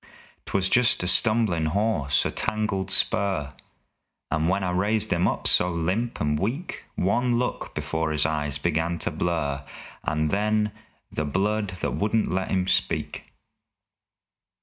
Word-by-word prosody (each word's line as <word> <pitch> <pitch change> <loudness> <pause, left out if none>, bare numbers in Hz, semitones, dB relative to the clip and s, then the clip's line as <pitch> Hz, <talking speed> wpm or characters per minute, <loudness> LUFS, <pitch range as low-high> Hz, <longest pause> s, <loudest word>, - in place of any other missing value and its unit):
'Twas 95 -1 +1
just 120 -2 +4
a - - -1
stumblin' 105 -5 +3
hawse, 80 - +1
a - - -1
tangled 105 -3 -1
spur 95 -5 +2 0.8
And, 80 +2 +1
when 95 +1 0
I 90 - -1
raised 100 +4 +1
him - - +2
up - - -2
so 90 - +6
limp 90 +8 -2
and 75 0 0
weak, 130 - -4
One 120 +6 +1
look 125 +1 -3
before 80 +2 -2
his 75 -1 +2
eyes 75 -2 -1
begun 85 +2 -1
to - - -1
blur 70 -5 -2 0.4
And 75 0 -1
then 105 +1 +1 0.4
the 75 - -2
blood 105 +7 -1
that - - -1
wouldn't 110 +2 0
let 95 +1 -1
'im 95 -1 0
speak! - - -1
95 Hz, 145 wpm, -25 LUFS, 80-105 Hz, 0.8 s, so